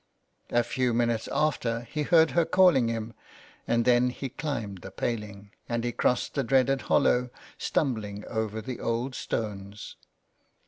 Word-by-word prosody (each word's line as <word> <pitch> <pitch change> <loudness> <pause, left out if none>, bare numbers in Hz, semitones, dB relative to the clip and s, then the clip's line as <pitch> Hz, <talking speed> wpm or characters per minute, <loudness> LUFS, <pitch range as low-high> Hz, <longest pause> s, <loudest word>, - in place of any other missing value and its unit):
A 120 - +2
few 125 -1 0
minutes 115 -1 0
after 125 -6 0
he 150 +6 -4
heard 160 +1 +4
her 170 - +3
calling 170 -9 +4
him, 115 0 -3 0.5
and 115 0 +2
then 125 0 +4
he 130 +2 -5
climbed 115 - -4
the 95 - -9
paling, 100 -1 -4 0.2
and 115 -1 -1
he 120 - -1
crossed 125 +1 0
the 140 - 0
dreaded 135 +2 +2
hollow, 125 -3 +3 0.3
stumbling 105 -7 -1
over 110 0 -3
the 125 +1 -5
old 120 +3 -2
stones. 105 -4 -5
120 Hz, 145 wpm, -27 LUFS, 110-130 Hz, 0.5 s, heard